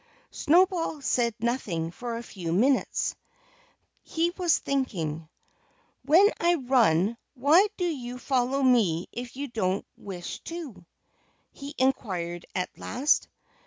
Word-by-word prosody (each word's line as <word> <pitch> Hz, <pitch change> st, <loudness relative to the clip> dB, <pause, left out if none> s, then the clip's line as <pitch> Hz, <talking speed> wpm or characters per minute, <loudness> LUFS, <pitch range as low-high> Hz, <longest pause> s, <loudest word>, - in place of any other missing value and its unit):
Snowball 345 Hz, -1 st, +2 dB
said 240 Hz, -4 st, 0 dB
nothing 205 Hz, -9 st, -2 dB
for 235 Hz, +5 st, -5 dB
a 235 Hz, -, -6 dB
few 180 Hz, -7 st, -6 dB
minutes. 250 Hz, +10 st, +1 dB, 0.9 s
He 335 Hz, +1 st, -1 dB
was 355 Hz, -2 st, +2 dB
thinking. 165 Hz, -, -2 dB, 0.7 s
"When 340 Hz, +8 st, +6 dB
I 345 Hz, +1 st, +3 dB
run, 235 Hz, -, +2 dB, 0.2 s
why 305 Hz, -, +5 dB
do 360 Hz, -, 0 dB
you 250 Hz, -7 st, -4 dB
follow 260 Hz, +1 st, 0 dB
me 210 Hz, -10 st, +3 dB
if 245 Hz, 0 st, -7 dB
you 285 Hz, +1 st, -3 dB
don't 200 Hz, -5 st, -1 dB
wish 180 Hz, -3 st, -7 dB
to?" 275 Hz, -, -8 dB, 0.6 s
he 285 Hz, +1 st, -9 dB
inquired 185 Hz, -10 st, -1 dB
at 180 Hz, -1 st, -2 dB
last. 270 Hz, +6 st, +1 dB
245 Hz, 120 wpm, -27 LUFS, 190-285 Hz, 0.9 s, When